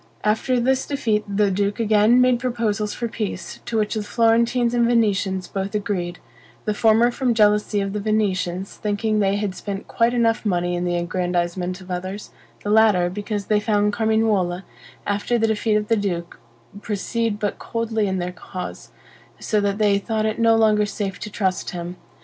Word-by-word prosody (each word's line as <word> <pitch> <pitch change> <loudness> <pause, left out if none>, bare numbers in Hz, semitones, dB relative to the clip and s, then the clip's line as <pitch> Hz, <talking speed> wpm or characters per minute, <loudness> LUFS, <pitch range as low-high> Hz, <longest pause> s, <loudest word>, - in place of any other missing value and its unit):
After 225 +4 +1
this 260 +2 +1
defeat 225 -7 0
the 200 0 +1
duke 200 +3 -1
again 220 +2 +4
made 250 -1 +4
proposals 225 -4 -1
for 235 - -3
peace, 210 -5 -5
to 230 - -2
which 210 -1 0
the 215 - -1
Florentines 235 +2 +2
and 240 -1 +3
Venetians 200 -5 +1
both 195 +1 -4
agreed; 185 -5 -2 0.5
the 210 - 0
former 225 +3 +4
from 245 -2 0
jealousy 210 -1 +3
of 195 0 -3
the 210 - -2
Venetians, 195 -3 -1
thinking 210 +1 0
they 195 -1 +2
had 205 -2 -2
spent 195 +1 -6
quite 235 +1 +1
enough 230 -1 +2
money 175 -4 0
in 175 0 -2
the 175 0 0
aggrandizement 180 +1 -2
of 185 0 -10
others; 185 +3 -5 0.3
the 205 - -1
latter, 210 -5 +4
because 205 +1 -4
they 210 +1 +2
found 210 -1 +1
Carmignuola, 215 -5 +1 0.4
after 205 +4 0
the 225 - +2
defeat 220 0 +1
of 210 0 0
the 225 - +3
duke, 175 -4 -3 0.4
proceed 220 +1 -2
but 205 -1 -2
coldly 225 -2 -1
in 190 -1 -1
their 180 0 -3
cause; 180 +1 -8 0.5
so 215 -2 0
that 200 0 0
they 205 -2 +3
thought 215 +2 -1
it 220 +1 -1
no 230 0 +5
longer 215 -2 +3
safe 200 -2 -4
to 210 - -6
trust 190 -3 -1
him. 175 0 -6
210 Hz, 180 wpm, -22 LUFS, 195-225 Hz, 0.5 s, no